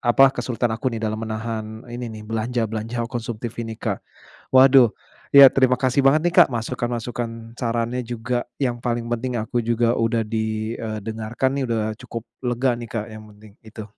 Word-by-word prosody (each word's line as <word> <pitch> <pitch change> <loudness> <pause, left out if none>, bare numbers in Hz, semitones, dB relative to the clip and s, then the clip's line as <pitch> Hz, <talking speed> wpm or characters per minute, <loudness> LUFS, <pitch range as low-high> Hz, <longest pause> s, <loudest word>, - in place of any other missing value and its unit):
apa 120 +3 +5
kesulitan 120 -1 -2
aku 120 +4 -1
nih 115 - -5
dalam 110 0 -1
menahan 110 0 -5
ini 120 0 -5
nih 110 -1 -8
belanja-belanja 115 +1 -2
konsumtif 120 -1 -4
ini 115 -1 -5
Kak. - - -2 0.6
Waduh 130 -1 +8 0.4
ya 140 -1 +9
terima 130 -1 +3
kasih 130 +1 +1
banget 135 +3 +4
nih 175 - +1
Kak - - -7
masukan-masukan, 120 -1 -4
sarannya 115 +1 -1
juga 120 +1 -3 0.2
yang 120 -2 0
paling 120 -1 -1
penting 125 +1 -2
aku 115 +2 -1
juga 115 0 +1
udah 115 0 +1
di, 110 0 -2
eee, 110 -1 -4
dengarkan 110 +4 -2
nih 135 - 0
udah 115 -1 0 0.2
cukup 115 -1 -6 0.2
lega 125 +1 0
nih 120 -1 -7
Kak 110 -2 -4
yang 110 0 -10
penting, 105 -1 -16
itu. 110 0 -8
115 Hz, 170 wpm, -22 LUFS, 110-125 Hz, 0.6 s, ya